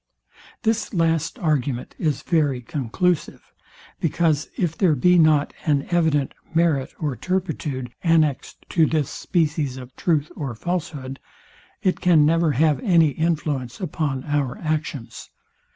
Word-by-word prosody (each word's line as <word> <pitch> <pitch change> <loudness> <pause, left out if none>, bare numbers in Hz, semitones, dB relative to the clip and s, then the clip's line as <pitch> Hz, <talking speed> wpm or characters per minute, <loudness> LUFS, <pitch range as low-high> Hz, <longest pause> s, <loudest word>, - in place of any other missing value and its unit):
This 225 -2 0
last 165 -2 +1
argument 140 -6 -1
is 150 -5 -1
very 145 -6 +1
conclusive; 145 +7 -2 0.5
because, 160 -2 +1
if 170 -4 0
there 170 -5 +3
be 180 +6 +4
not 155 -2 +4
an 145 -3 +1
evident 160 -5 +2 0.2
merit 160 -5 +2
or 150 -5 -2
turpitude 150 -9 -3
annexed 160 -5 +1
to 160 -3 +3
this 155 -3 0
species 150 -5 -1
of 130 0 -10
truth 155 -4 0
or 135 -6 -4
falahood, 140 -3 -4 0.6
It 185 - +1
can 165 -4 +5
never 165 0 +3
have 150 +2 +2
any 170 -8 +4
influence 145 -5 -2
upon 145 -6 -2
our 145 -4 -1
actions. 155 -6 -4
155 Hz, 125 wpm, -23 LUFS, 140-165 Hz, 0.6 s, can